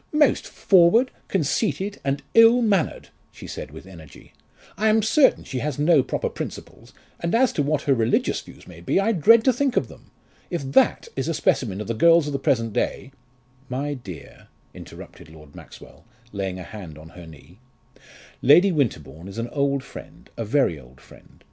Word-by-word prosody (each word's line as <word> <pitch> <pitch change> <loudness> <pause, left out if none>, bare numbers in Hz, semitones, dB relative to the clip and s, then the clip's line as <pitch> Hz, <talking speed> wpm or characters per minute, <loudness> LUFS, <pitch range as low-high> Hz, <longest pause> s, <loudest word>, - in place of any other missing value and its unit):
"Most 300 -3 +2
forward, 200 +7 +3 0.2
conceited, 195 +4 -1
and 140 +1 -2
ill 230 +2 +6
mannered," 195 -7 -1 0.2
she - - -12
said - - -7
with 80 +5 -12
energy. 85 -6 -15 0.4
"I 220 - 0
am 220 0 +3
certain 265 +6 +3
she 130 - -5
has 145 0 -3
no 150 0 +4
proper 130 - -3
principles, - - -9 0.3
and 170 +5 -1
as 255 +1 +2
to - - -1
what 145 0 -1
her 140 - +2
religious 115 -3 0
views - - -16
may 85 -2 -13
be, 85 - 0
I 205 +3 +1
dread 225 +4 +5
to 260 - +3
think 265 +1 -1
of - - 0
them! - - -17 0.4
If 170 -5 -4
that 135 - +2
is 135 +2 -3
a 165 - -2
specimen 105 -9 0
of - - -5
the 115 - -2
girls 165 +6 +4
of 145 - -4
the 140 - -2
present 115 -5 0
day 130 - -3 0.3
" 125 +2 -34
"My 145 +1 -3
dear," 95 - -11 0.3
interrupted - - -13
Lord 75 -2 -16
Maxwell, - - -15 0.3
laying 95 -2 -4
a 90 - -8
hand 90 -7 -10
on 80 +1 -13
her 85 -1 -13
knee, 80 +5 -16 0.8
"Lady 170 +9 +5
Winterbourne 85 - -3
is 100 - -10
an 115 +1 -4
old 140 -2 -1
friend, 135 - -13
a 115 - -4
very 110 - 0
old 65 0 -18
friend. - - -19
140 Hz, 185 wpm, -23 LUFS, -, 0.8 s, ill